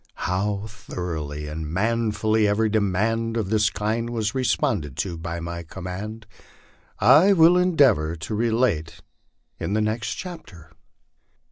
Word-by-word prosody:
How 100 +2 -1
thoroughly 80 -8 -5
and 75 0 -5
manfully 110 +2 +1
every 110 +2 +2
demand 110 +3 0
of 105 -3 -2
this 105 -1 +3
kind 110 +3 -2
was 115 -3 -2
re 130 -1 -1
sponded 75 - 0
to 85 +3 -3
by 85 +1 -5
my 85 0 -5
command, 95 +6 -7 0.7
I 150 - +6
will 170 -1 +6
endeavor 140 - +3
to 80 +4 -6
relate 110 -8 0 0.6
in 100 - -2
the 110 - +1
next 110 -1 -2
chapter. 150 - -10
105 Hz, 130 wpm, -24 LUFS, 85-115 Hz, 0.7 s, I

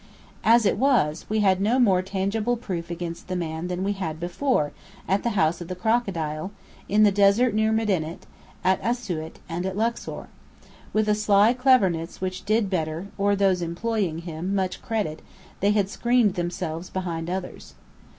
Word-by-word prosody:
As 230 0 +5
it 195 - +2
was, 235 - +2
we 215 0 +1
had 190 -2 +3
no 220 +5 +2
more 195 -8 +4
tangible 200 +5 -1
proof 175 -7 -5
against 170 -1 -5
the 185 - -3
man 165 -1 -3
than 180 +1 -3
we 200 - 0
had 160 -5 -4
before, 175 - 0 0.4
at 195 +2 +2
the 235 -3 -1
House 165 +1 +2
of 175 - -6
the 185 - -4
Crocodile, 180 -6 -1 0.4
in 210 +2 +4
the 205 - +6
desert 205 +4 +4
near 220 +1 +2
Medinet, 190 -8 -1 0.4
at 190 0 +2
Asiut, 185 -10 -3
and 175 0 -3
at 190 +1 -3
Luxor. 230 +2 -2 0.7
With 215 0 +1
a 210 - +4
sly 210 +1 +4
cleverness 200 -11 +2
which 185 0 -4
did 215 0 +2
Bedr, 165 0 -2
or 200 0 +2
those 190 -2 +2
employing 170 -1 -2
him, 175 +4 -3
much 190 -2 -1
credit, 205 -9 -2 0.4
they 200 - +2
had 205 -2 +2
screened 235 -1 +2
themselves 175 -1 -4
behind 170 -3 -3
others. 185 0 -6
190 Hz, 170 wpm, -25 LUFS, 175-215 Hz, 0.7 s, the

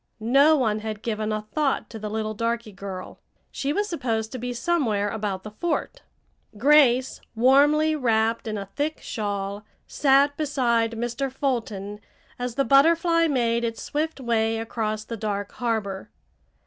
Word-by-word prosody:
No 300 +3 +6
one 220 -5 +1
had 215 -1 -6
given 215 -1 -2
a 215 0 -2
thought 280 +5 -1
to 225 - -7
the 210 0 -5
little 215 0 -2
darky 230 0 -2
girl. 190 -1 -8 0.3
She 280 - -2
was 410 +6 0
supposed 225 - -2
to 255 - -5
be 245 +1 -3
somewhere 235 -6 0
about 205 -3 -3
the 215 - -8
fort. 345 - -3 0.6
Grace, 260 0 +4
warmly 290 +6 +4
wrapped 230 -4 +1
in 215 -1 -2
a 200 - -5
thick 290 +10 -3
shawl, 205 -2 -4 0.2
sat 280 0 +3
beside 240 -6 +1
Mr. 240 +4 -3
Fulton 220 -7 -3 0.4
as 245 -1 -3
the 275 - +1
Butterfly 330 +4 +4
made 235 -5 +1
its 230 -1 -3
swift 310 +1 -2
way 225 -3 0
across 220 -1 -3
the 230 +1 -6
dark 205 -2 -3
harbor. 215 -5 -3
230 Hz, 150 wpm, -25 LUFS, 215-275 Hz, 0.6 s, No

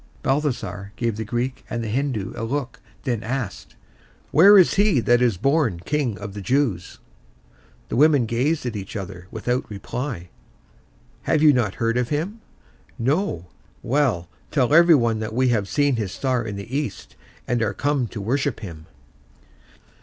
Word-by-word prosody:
Balthasar 110 -9 -2
gave 115 -2 -1
the 110 - -4
Greek 120 +4 -3
and 120 -1 -3
the - - -3
Hindoo 120 -3 -2
a 115 - -5
look, 130 +1 -3 0.2
then 120 -4 -1
asked, 120 -4 -5 0.6
"Where 200 +6 +8
is 185 - +6
he 200 -8 +3
that 120 +1 +3
is 120 -6 +2
born 135 - +1
King 140 -7 -1
of 100 -1 -7
the 100 - -6
Jews?" 120 -6 0 0.9
The - - -2
women 145 -2 +5
gazed 130 +7 0
at 120 -3 -3
each 100 +2 -6
other 95 -3 -7
without 125 +2 -2
reply. 105 -1 -5 1.0
"You - - +1
have 155 -1 +3
not 125 -9 +4
heard 115 +1 0
of 125 - -1
him?" 175 +10 -3 0.6
"No." 130 - 0 0.4
"Well, 125 -10 +1 0.2
tell 135 -1 +1
everybody 150 -10 +5
that 110 0 -4
we 130 +1 +3
have 105 -5 +1
seen 145 -1 +1
his 105 -5 -2
star 130 0 -1
in 105 -3 -5
the 100 +6 -6
east, 140 -7 -4 0.3
and 120 -1 0
are 110 - 0
come 145 -4 0
to 110 - -7
worship 130 +5 -1
him." 80 -6 -9
120 Hz, 160 wpm, -23 LUFS, 105-145 Hz, 1.0 s, Where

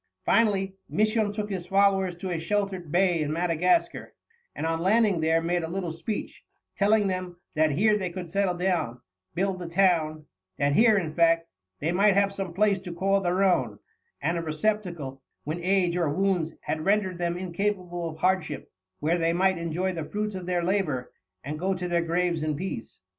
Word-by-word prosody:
Finally, 195 -4 +2 0.2
Misson 215 0 +1
took 210 0 -4
his 185 -3 -4
followers 195 -2 +3
to 180 +1 -5
a 170 - -1
sheltered 190 -2 -2
bay 175 -1 +3
in 150 -1 -1
Madagascar, 175 - 0 0.4
and - - -3
on 165 0 0
landing 200 -1 +3
there 165 +1 +2
made 175 +1 0
a 160 - -3
little 180 -1 -3
speech, 165 +7 -5 0.3
telling 210 +1 +3
them 185 -2 -3 0.2
that 155 -2 +2
here 210 +8 +3
they 190 -3 -2
could 175 0 -6
settle 190 +1 0
down, 175 -10 -1 0.4
build 190 0 -1
a 175 - -5
town, 165 -4 +2 0.3
that 140 0 +2
here, 220 +4 +5
in 165 -5 -2
fact, 165 0 +3 0.3
"they 160 +3 0
might 200 +2 +4
have 200 0 +3
some 195 -3 -4
Place 200 +2 +2
to 180 -2 -8
call 195 +3 +1
their 185 +1 +1
own; 190 -2 +2 0.4
and 170 +1 0
a - - -2
Receptacle, 165 -5 -2 0.2
when 155 +4 -3
Age 180 -1 +1
or 170 -4 +1
Wounds 170 -1 0
had 155 0 -3
render'd 190 -2 +1
them 175 0 -1
incapable 180 -1 -2
of 155 - -9
Hardship, 185 -3 -1 0.3
where 165 +4 +1
they 165 0 +2
might 190 0 +2
enjoy 170 +3 -1
the 165 -2 -4
Fruits 210 +6 -3
of 185 -2 -6
their 175 -1 0
Labour, 170 -9 -1 0.3
and 150 +3 -5
go 190 +2 0
to 180 0 -3
their 170 -1 +1
Graves 170 0 0
in 155 -1 -1
Peace." 175 -7 -6
180 Hz, 185 wpm, -27 LUFS, 165-195 Hz, 0.4 s, here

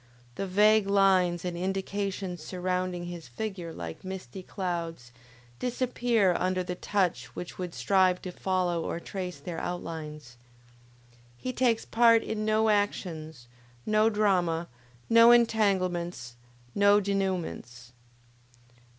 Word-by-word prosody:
The 195 +10 -4
vague 210 +2 +4
lines 185 -3 +3
and 175 -1 -3
indications 190 0 -3
surrounding 180 0 -2
his 175 -4 -8
figure 175 - -5
like 85 - -8
misty 190 -3 -7
clouds, 170 - -4 0.5
disappear 240 -5 +1
under 185 0 0
the 180 - -4
touch 180 -7 -1
which 175 - -7
would 180 -2 -5
strive 185 -2 +3
to 185 - -5
follow 180 -2 -1
or 170 - -3
trace 180 0 -6
their 175 -3 -6
outlines. 150 -7 -6 1.0
He 255 - -4
takes 240 -3 +1
part 230 -1 +5
in 215 -1 -3
no 215 0 +2
actions, 160 - -2 0.4
no 215 +1 +3
drama, 180 -6 +1 0.4
no 230 0 +7
entanglements, 185 - +2 0.4
no 200 0 +5
denouements. 185 - -3
185 Hz, 115 wpm, -28 LUFS, 170-205 Hz, 1.0 s, no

